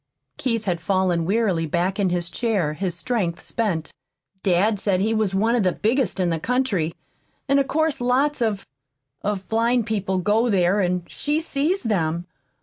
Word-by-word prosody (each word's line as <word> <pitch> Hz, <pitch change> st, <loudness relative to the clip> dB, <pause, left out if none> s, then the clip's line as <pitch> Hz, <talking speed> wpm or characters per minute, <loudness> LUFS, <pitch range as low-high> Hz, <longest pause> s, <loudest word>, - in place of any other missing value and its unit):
Keith 230 Hz, -4 st, -1 dB
had 175 Hz, -4 st, -1 dB
fallen 180 Hz, -1 st, +1 dB
wearily 190 Hz, -5 st, +1 dB
back 180 Hz, +5 st, 0 dB
in 195 Hz, -2 st, +2 dB
his 175 Hz, 0 st, -2 dB
chair, 205 Hz, -11 st, 0 dB
his 175 Hz, +2 st, -2 dB
strength 185 Hz, -5 st, -1 dB
spent. 190 Hz, -9 st, -2 dB, 0.5 s
"Dad 200 Hz, +3 st, +2 dB
said 195 Hz, -2 st, +1 dB
he 215 Hz, +3 st, +1 dB
was 215 Hz, -3 st, 0 dB
one 220 Hz, +4 st, +2 dB
of 240 Hz, -, +2 dB
the 185 Hz, -2 st, +2 dB
biggest 230 Hz, -2 st, 0 dB
in 180 Hz, -2 st, +2 dB
the 165 Hz, -, -1 dB
country. 200 Hz, -8 st, 0 dB, 0.5 s
And 275 Hz, +1 st, +4 dB
of 275 Hz, -, +1 dB
course 315 Hz, -1 st, 0 dB
lots 260 Hz, +4 st, +1 dB
of 215 Hz, -4 st, 0 dB, 0.6 s
of 195 Hz, -2 st, -3 dB
blind 230 Hz, +1 st, +2 dB
people 200 Hz, -3 st, -1 dB
go 210 Hz, +6 st, +2 dB
there, 190 Hz, -1 st, +3 dB
and 180 Hz, -1 st, 0 dB
she 300 Hz, +1 st, -1 dB
sees 320 Hz, +3 st, 0 dB
them. 170 Hz, -6 st, 0 dB
205 Hz, 170 wpm, -23 LUFS, 180-235 Hz, 0.6 s, And